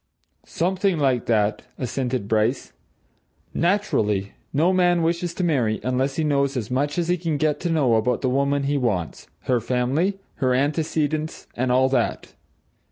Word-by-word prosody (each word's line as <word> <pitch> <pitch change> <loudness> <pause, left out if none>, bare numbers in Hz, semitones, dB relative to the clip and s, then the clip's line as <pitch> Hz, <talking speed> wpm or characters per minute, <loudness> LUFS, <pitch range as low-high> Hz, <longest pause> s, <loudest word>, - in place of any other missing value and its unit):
"Something 185 +1 0
like 130 -5 +1
that," 105 -2 +1 0.2
assented 125 -3 -2
Bryce. 110 +4 0 0.8
"Naturally 105 - 0 0.2
no 165 +6 +2
man 175 -2 +3
wishes 170 +1 -1
to 185 - -2
marry 125 -10 +1
unless 130 +2 0
he 160 - 0
knows 140 -2 +1
as 115 -1 -4
much 145 +4 0
as 170 -2 0
he 180 +1 +2
can 165 -3 -2
get 150 0 0
to 175 - -2
know 145 -7 +2
about 115 +2 +1
the 130 - 0
woman 140 +2 +1
he 145 +1 0
wants, 100 - -2
her 125 -2 +1
family, 130 - 0 0.2
her 130 -3 +1
antecedents 155 +2 -1
and 125 +1 0
all 130 +1 +4
that. 130 -3 -1
140 Hz, 160 wpm, -23 LUFS, 125-165 Hz, 0.8 s, all